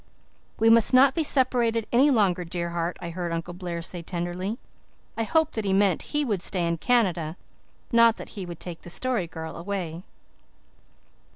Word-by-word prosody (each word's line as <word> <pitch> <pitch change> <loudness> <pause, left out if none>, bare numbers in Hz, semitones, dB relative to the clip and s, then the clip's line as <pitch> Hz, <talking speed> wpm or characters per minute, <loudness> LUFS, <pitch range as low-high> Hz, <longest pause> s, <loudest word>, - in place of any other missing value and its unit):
"We 225 +1 +4
must 230 +2 +5
not 265 +2 +6
be 330 - 0
separated 240 -5 +2
any 265 +5 +5
longer, 195 -8 +2
dear 170 0 -4
heart," 170 +1 -2
I 170 -1 -5
heard 175 0 -4
Uncle 165 +1 -4
Blair 175 -2 -5
say 175 +1 -5
tenderly. 175 +5 -4 0.6
I 230 - -2
hoped 320 +7 +1
that 220 - -2
he 195 -1 0
meant 195 -2 +3 0.2
he 295 - +2
would 205 -8 -1
stay 180 -2 0
in 170 -1 -1
Canada 185 -9 +1 0.5
not 230 -1 +5
that - - -9
he 200 - -7
would 175 -2 -8
take 175 -2 -8
the - - -10
Story 235 -1 -1
Girl 160 0 -7
away. 175 -2 -4
190 Hz, 180 wpm, -26 LUFS, 170-230 Hz, 0.6 s, not